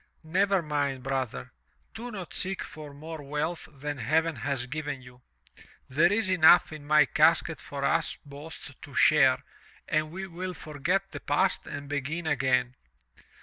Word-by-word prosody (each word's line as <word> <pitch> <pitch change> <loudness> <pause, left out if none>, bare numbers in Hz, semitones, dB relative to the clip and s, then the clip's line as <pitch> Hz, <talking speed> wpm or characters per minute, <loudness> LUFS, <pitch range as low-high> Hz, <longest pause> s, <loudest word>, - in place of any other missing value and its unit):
"Never 190 +3 +2
mind, 140 -4 -1
brother, 130 - -3 0.4
do 240 +2 -6
not 185 -9 -7
seek 190 0 -1
for 150 -1 -9
more 155 +2 -8
wealth 150 +3 -3
than 145 0 -5
heaven 155 +5 +1
has 125 +1 -2
given 145 -1 -4
you. 125 0 -15 0.7
There 160 +7 +3
is 215 0 +1
enough 175 -2 +6
in 150 -2 -9
my 150 -1 +6
casket - - +3
for - - -4
us - - +1
both 145 +3 -10
to - - -11
share - - +5 0.4
and 155 0 +1
we 190 +4 -5
will 180 0 -5
forget 175 +7 -2
the 145 - -6
past 165 +8 +1
and 145 0 -6
begin 145 +4 -3
again." 130 -4 +1
150 Hz, 150 wpm, -28 LUFS, 140-175 Hz, 0.7 s, enough